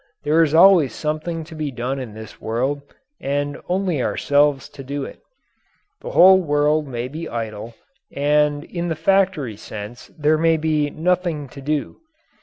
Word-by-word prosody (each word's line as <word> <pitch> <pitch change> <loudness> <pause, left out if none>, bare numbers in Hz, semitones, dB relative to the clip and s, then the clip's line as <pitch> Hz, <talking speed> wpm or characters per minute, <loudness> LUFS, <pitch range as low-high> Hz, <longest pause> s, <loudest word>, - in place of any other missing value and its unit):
There 155 +3 +3
is 160 -1 +2
always 170 - +6
something 155 +2 -3
to 160 - -12
be 155 -2 -3
done 130 +1 -3
in 115 -5 -7
this 110 -1 -11
world, 130 +6 -1 0.4
and 145 +1 -2
only 180 -6 0
ourselves 145 +1 +1
to 135 - -11
do 140 +1 -4
it. - - -11 0.8
The - - -6
whole 190 +2 +7
world 150 -1 +1
may 120 -2 -4
be 160 +5 -7
idle, 115 0 -5 0.4
and 145 +1 +1
in 170 0 -4
the 165 - -1
factory 185 - +1
sense 110 +2 -9
there 155 +1 +2
may 165 0 +3
be 155 -2 0
"nothing 170 -2 -1
to 140 - -11
do." 150 +1 -2
150 Hz, 160 wpm, -21 LUFS, 135-160 Hz, 0.8 s, whole